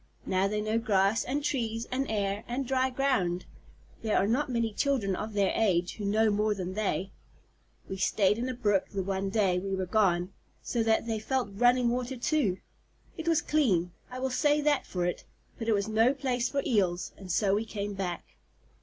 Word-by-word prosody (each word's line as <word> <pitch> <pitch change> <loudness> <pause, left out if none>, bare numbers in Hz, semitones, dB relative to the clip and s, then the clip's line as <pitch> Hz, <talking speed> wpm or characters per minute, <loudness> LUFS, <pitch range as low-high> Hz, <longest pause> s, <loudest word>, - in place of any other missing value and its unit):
Now 190 +1 +1
they 210 +1 -1
know 215 +2 0
grass, 210 -1 +2
and 280 +3 -2
trees, 230 -5 -1
and 270 +2 -1
air, 205 -1 -1
and 255 +3 -2
dry 260 0 +2
ground. 250 -10 0 0.6
There 220 -2 +1
are - - +3
not 255 +7 +1
many 230 -3 0
children 230 -8 0
of 215 +3 -5
their 200 -2 +2
age 180 -5 +1
who 210 - -4
know 215 +2 +3
more 210 +1 +1
than 185 -1 -4
they. 195 -2 -1 0.8
We 190 - -5
stayed 195 +2 +2
in 250 +2 -2
a 255 - -3
brook 205 -5 +1
the 195 -2 -3
one 195 +1 -2
day 195 -4 +2
we 195 +1 -2
were 190 -1 -2
gone, 180 -2 +1 0.3
so 235 - -1
they 225 0 +3 0.2
have 215 - -8
felt 260 -3 0
running 245 +3 +3
water 250 +2 -2
too. 240 - +1 0.6
It 325 -1 -6
was 330 -2 +3
clean 195 - +2 0.2
I 250 - -7
will 260 0 -2
say 295 +3 +3
that 295 -1 +1
for 180 -2 -2
it 175 - -2 0.4
but 225 - -4
it 225 - +4
was 200 0 0
no 225 +5 +3
place 255 -3 -1
for 280 -1 -1
Eels, 185 -6 +1
and 190 -2 -8
so 195 +2 +2
we 210 +2 +1
came 205 -2 -4
back." 185 -3 -4
215 Hz, 200 wpm, -29 LUFS, 195-250 Hz, 0.8 s, it